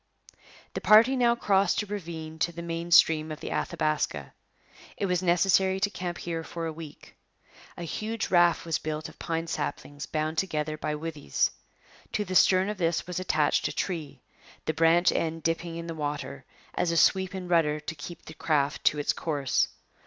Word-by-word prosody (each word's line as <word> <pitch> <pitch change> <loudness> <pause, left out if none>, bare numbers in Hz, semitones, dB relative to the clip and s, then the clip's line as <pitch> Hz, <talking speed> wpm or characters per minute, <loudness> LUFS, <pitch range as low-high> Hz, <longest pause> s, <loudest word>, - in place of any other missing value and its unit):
The - - -4
party 225 +5 +6
now 240 -2 +3
crossed 200 -2 +2
a - - -7
ravine 165 -6 -6
to 170 - +1
the 170 0 -7
main 170 0 -4
stream 160 -2 +5
of 155 - -6
the - - -6
Athabaska. 145 - -1 0.6
It - - -1
was 180 -1 0
necessary 190 +1 +3
to 205 +1 +1
camp 175 -3 -4
here 165 -1 -4
for 165 +1 -5
a 160 - -3
week. 155 -2 -11 0.6
A 175 - -5
huge 220 +7 -3
raft 175 -2 +4
was 165 -2 0
built 155 -1 -4
of - - -18
pine 165 -1 -2
saplings 145 -3 -4
bound 155 0 -1
together 155 -4 -2
by 150 0 -3
withes. 150 - -1 0.6
To 210 - 0
the 185 - -5
stern 185 +1 +5
of 210 -1 -4
this 165 -1 0
was 180 0 -4
attached 155 -5 +1
a - - -4
tree, 165 -6 -4 0.4
the 155 - 0
branch 165 +2 +4
end 165 -1 -2
dipping 165 0 -1
in 170 0 -5
the 165 - -5
water, 145 -3 -4 0.3
as 175 - 0
a 170 - 0
sweep 190 +2 +3
and 185 -1 -5
rudder 160 -4 +2
to 150 +2 -6
keep 165 +3 -10
the 160 - -9
craft 145 -3 0
to 150 - +4
its 145 - +1
course. 145 -5 0
165 Hz, 185 wpm, -28 LUFS, 155-180 Hz, 0.6 s, party